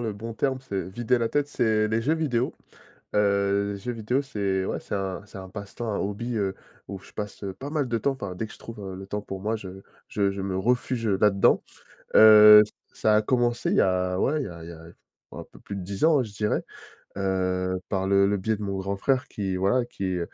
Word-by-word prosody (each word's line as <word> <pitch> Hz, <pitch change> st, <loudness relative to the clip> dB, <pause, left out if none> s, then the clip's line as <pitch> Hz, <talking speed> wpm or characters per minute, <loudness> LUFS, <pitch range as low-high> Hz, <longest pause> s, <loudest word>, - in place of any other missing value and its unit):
le 110 Hz, -3 st, -3 dB
bon 115 Hz, +3 st, -6 dB
terme, 130 Hz, +2 st, -1 dB
c'est 95 Hz, -3 st, -3 dB
«vider 120 Hz, +5 st, 0 dB
la 115 Hz, -1 st, 0 dB
tête». 145 Hz, -1 st, 0 dB
C'est 110 Hz, -5 st, +1 dB
les 110 Hz, +1 st, +1 dB
jeux 150 Hz, +8 st, +1 dB
vidéo, 130 Hz, -7 st, -1 dB, 0.6 s
heu, 100 Hz, 0 st, +1 dB
jeux 120 Hz, +5 st, -4 dB
vidéo, 120 Hz, +5 st, -1 dB
c'est, 100 Hz, -7 st, -1 dB
ouais, -, -, -3 dB
c'est -, -, -6 dB
un 95 Hz, -2 st, -3 dB
c'est -, -, -13 dB
un 95 Hz, -1 st, -9 dB
passe-temps, 105 Hz, +2 st, -6 dB
un -, -, -1 dB
hobby, 110 Hz, +4 st, -3 dB
heu, 95 Hz, -2 st, -1 dB, 0.3 s
où 100 Hz, -, -6 dB
je -, -, -17 dB
passe, 105 Hz, -1 st, -6 dB
heu, 95 Hz, -, -3 dB
pas 135 Hz, +8 st, -7 dB
mal 150 Hz, -4 st, 0 dB
de 115 Hz, -, 0 dB
temps, 140 Hz, +5 st, +1 dB
enfin, 100 Hz, -9 st, -6 dB
dès 110 Hz, -, -3 dB
que -, -, -13 dB
je -, -, -16 dB
trouve, 115 Hz, -2 st, -10 dB
heu, 95 Hz, -2 st, -6 dB
le 95 Hz, +1 st, -9 dB
temps 105 Hz, +1 st, -3 dB
pour 95 Hz, -2 st, -7 dB
moi, 110 Hz, +3 st, -1 dB
je 95 Hz, -2 st, -9 dB, 0.3 s
je 100 Hz, -1 st, +1 dB
je 100 Hz, 0 st, -5 dB
me 95 Hz, -1 st, -2 dB
refuge, 120 Hz, +2 st, 0 dB
heu, 100 Hz, -2 st, +1 dB
là-dedans. 100 Hz, -2 st, +4 dB, 0.5 s
Heu, 105 Hz, -1 st, +10 dB
ç -, -, -15 dB, 0.2 s
ça 110 Hz, -1 st, +2 dB
a 105 Hz, -, +4 dB
commencé, 120 Hz, +1 st, 0 dB
il -, -, +2 dB
y -, -, +6 dB
a, 90 Hz, 0 st, +1 dB
ouais, 150 Hz, +2 st, +1 dB
il -, -, -3 dB
y -, -, -6 dB
a 85 Hz, -1 st, -10 dB
il 85 Hz, -, -9 dB
y -, -, -8 dB
a, 80 Hz, 0 st, -13 dB, 0.5 s
oh, -, -, -8 dB
un -, -, -8 dB
peu -, -, -17 dB
plus 100 Hz, -, -7 dB
de -, -, -5 dB
10 100 Hz, +5 st, -5 dB
ans, 160 Hz, -2 st, +5 dB
ouais, 130 Hz, -, +1 dB
je 105 Hz, -, -12 dB
dirais. 105 Hz, +1 st, 0 dB, 0.5 s
Heu, 95 Hz, -1 st, -1 dB
par 95 Hz, -1 st, -1 dB
le 100 Hz, 0 st, +4 dB
le 100 Hz, 0 st, +1 dB
biais 110 Hz, +3 st, -1 dB
de -, -, -9 dB
mon 100 Hz, -1 st, -3 dB
grand 100 Hz, +1 st, -2 dB
frère 130 Hz, +4 st, 0 dB
qui, 95 Hz, -3 st, -3 dB
voilà, 100 Hz, +7 st, +2 dB
qui 95 Hz, -6 st, -3 dB
105 Hz, 255 wpm, -26 LUFS, 95-115 Hz, 0.6 s, Heu